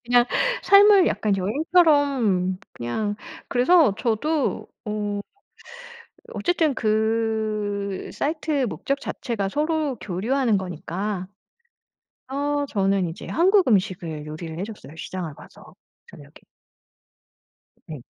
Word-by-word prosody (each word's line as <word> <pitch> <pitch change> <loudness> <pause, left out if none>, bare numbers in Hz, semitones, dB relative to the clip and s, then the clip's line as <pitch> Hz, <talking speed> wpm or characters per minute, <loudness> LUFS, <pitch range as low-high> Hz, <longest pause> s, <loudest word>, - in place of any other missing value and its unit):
그냥 245 0 +4 0.4
삶을 400 -1 +7
약간 210 -2 +1
여행처럼 260 - +2
그냥 205 - -3 0.3
그래서 255 - +4
저도 280 +6 0 0.2
어 210 -1 -2 1.1
어쨌든 335 -5 +1
그 215 -3 -1
사이트의 300 -2 -1
목적 275 +6 -2
자체가 205 -6 -3
서로 300 +2 0
교류하는 220 +5 0
거니까. 185 +2 -4 1.1
어 290 +1 0
저는 195 -6 +1
이제 165 - -8
한국 380 +4 +3
음식을 180 -7 0
요리를 160 +1 -7
해줬어요, 205 -7 -8
시장을 165 -1 -6
봐서. - - -16 0.4
저녁에. - - -14 1.6
네. 150 -6 -8
220 Hz, 220 characters per minute, -24 LUFS, 190-285 Hz, 1.6 s, 삶을